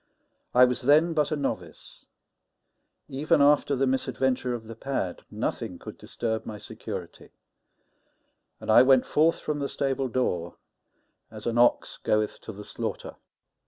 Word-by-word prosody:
I 125 +1 +8
was 125 +1 -1
then 155 +6 +4
but 150 -3 +1
a - - +1
novice; 140 -2 -6 1.0
even 145 +3 +1
after 145 0 +4
the 135 +1 +1
misadventure 130 -1 0
of 115 - -7
the 115 +1 -10
pad 115 -8 -3
nothing - - -3
could - - -10
disturb 110 -2 -3
my 105 - -7
security, - - -8 1.3
and - - -2
I - - +8
went 130 0 +5
forth 160 +2 +2
from 150 -1 -3
the 140 - -2
stable 135 -1 -1
door 90 -9 -2 0.7
as 110 -1 -11
an 120 0 0
ox 120 - +3
goeth 105 0 0
to - - -8
the 105 0 -10
slaughter. - - -5
130 Hz, 145 wpm, -27 LUFS, 115-140 Hz, 1.3 s, I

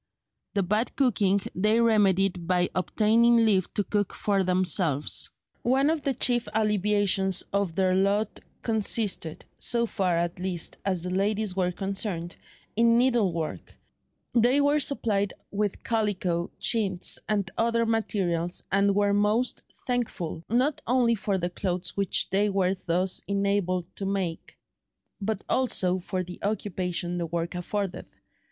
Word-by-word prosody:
The 200 - +2
bad 210 +6 -1
cooking 200 -7 +2
they 215 +5 +2
remedied 195 -6 +2
by 180 -1 +1
obtaining 230 +4 +3
leave 195 -4 +2
to 205 - +1
cook 205 0 -1
for 200 -2 +1
themselves. 180 -5 +2 0.3
One 270 +5 +2
of 320 -2 -1
the 270 -1 -1
chief 240 0 +1
alleviations 205 -3 +2
of 200 -5 0
their 185 0 +2
lot 200 +3 +1 0.2
consisted—so 220 +1 0
far, 190 -6 0
at 170 +1 -2
least, 180 -2 -3
as 185 -4 -1
the 180 - -4
ladies 200 +1 0
were 180 -2 +1
concerned—in 195 +4 -2
needlework; 210 -11 0 0.6
they 245 +4 +4
were 290 +1 +3
supplied 205 -9 0 0.2
with 205 -1 -2
calico, 190 -6 -1
chintz, 195 -6 +2
and 200 -3 0
other 230 0 +1
materials, 185 -6 -1
and 200 +1 +3
were 205 0 +2
most 210 +5 +1 0.2
thankful, 220 -10 -3
not 255 +6 +1
only 245 -1 +3
for 200 -2 -1
the 175 -1 -2
clothes 180 -1 -3
which 200 -2 +1
they 205 +2 +2
were 190 -2 +1
thus 185 0 -1
enabled 200 -3 0
to 195 - -3
make, 190 -4 -3 0.6
but 205 0 -2
also 185 -8 +1
for 185 +1 -3
the 180 0 -10
occupation 180 -4 -2
the 170 - -2
work 170 +1 -3
afforded. 190 +2 -4
200 Hz, 135 wpm, -26 LUFS, 180-220 Hz, 0.6 s, they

